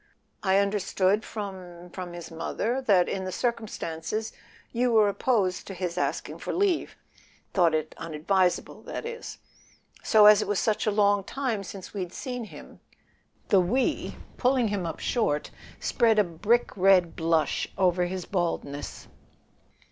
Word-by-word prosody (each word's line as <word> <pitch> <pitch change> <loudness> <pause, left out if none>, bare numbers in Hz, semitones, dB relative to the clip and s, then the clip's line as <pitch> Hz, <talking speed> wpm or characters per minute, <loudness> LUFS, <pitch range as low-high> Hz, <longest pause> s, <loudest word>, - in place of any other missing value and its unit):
"I 190 -1 +3
understood 200 0 +1
from—from 180 -3 -7
his 175 -1 -8
mother 225 +10 -2
that, 195 -8 +4
in 190 - -2
the 185 - -4
circumstances, 215 -3 -3 0.4
you 245 +1 +1
were 215 -2 +5
opposed 200 -2 0
to 195 - -6
his 175 -1 -3
asking 180 - -2
for - - -4
leave; 375 -2 0 0.6
thought 170 -4 +4
it 155 0 -2
unadvisable, 175 +3 0
that - - -5
is. 470 0 -6 0.6
So, 215 -2 +5
as 210 0 +8
it - - -3
was 205 -2 +1
such 215 0 0
a - - +4
long 205 -1 +3
time 235 -3 -2
since 195 -1 -9
we'd 185 -3 -4
seen 250 -4 -5
him - - -13 0.3
" - - -40
The 195 - +6
"we," 240 +9 0 0.2
pulling 250 -3 +2
him 195 -4 -2
up 160 - -5
short, 150 -12 0 0.3
spread 225 -2 +2
a 210 - +6
brick 205 +7 0
red 185 -3 +4
blush 165 -1 +1
over 180 -2 +3
his 185 0 -4
baldness. 165 -6 -3
195 Hz, 150 wpm, -27 LUFS, 175-220 Hz, 0.6 s, as